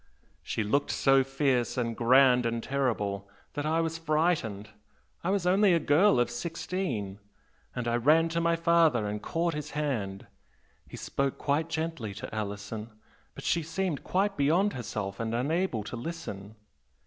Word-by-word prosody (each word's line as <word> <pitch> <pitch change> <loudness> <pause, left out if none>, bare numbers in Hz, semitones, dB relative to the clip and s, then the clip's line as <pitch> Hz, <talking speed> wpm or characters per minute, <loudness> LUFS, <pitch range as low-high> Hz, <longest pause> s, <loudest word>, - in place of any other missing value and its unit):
She 110 - -2
looked 140 +8 +1
so 135 -1 +4
fierce 135 -2 0
and 115 -2 -1
grand 125 +1 +5
and 115 0 -2
terrible 105 -8 -1 0.2
that 145 0 -2
I 160 +1 +2
was 165 0 -2
frightened 155 - 0 0.5
I 175 - 0
was 195 -2 0
only 190 +1 +4
a 170 - +4
girl 165 +4 +4
of 120 - +1
sixteen, 125 - -3 0.6
and 125 -1 -3
I 120 0 +2
ran 155 +7 +4
to 170 +1 -1
my 170 0 +2
father 165 -8 +3
and 105 0 -4
caught 170 0 -1
his 150 0 -5
hand. 110 -10 -2 0.6
He - - -9
spoke 140 -1 -2
quite 150 +3 0
gently 160 -10 -3
to 120 +4 -7
Alison, 105 +1 -5 0.5
but - - -9
she 170 - +1
seemed 165 0 -2
quite 195 +2 0
beyond 170 +9 +3
herself 105 -5 -5
and 115 0 -2
unable 140 - 0
to 105 - -6
listen. 115 - -6
140 Hz, 160 wpm, -29 LUFS, 115-165 Hz, 0.6 s, grand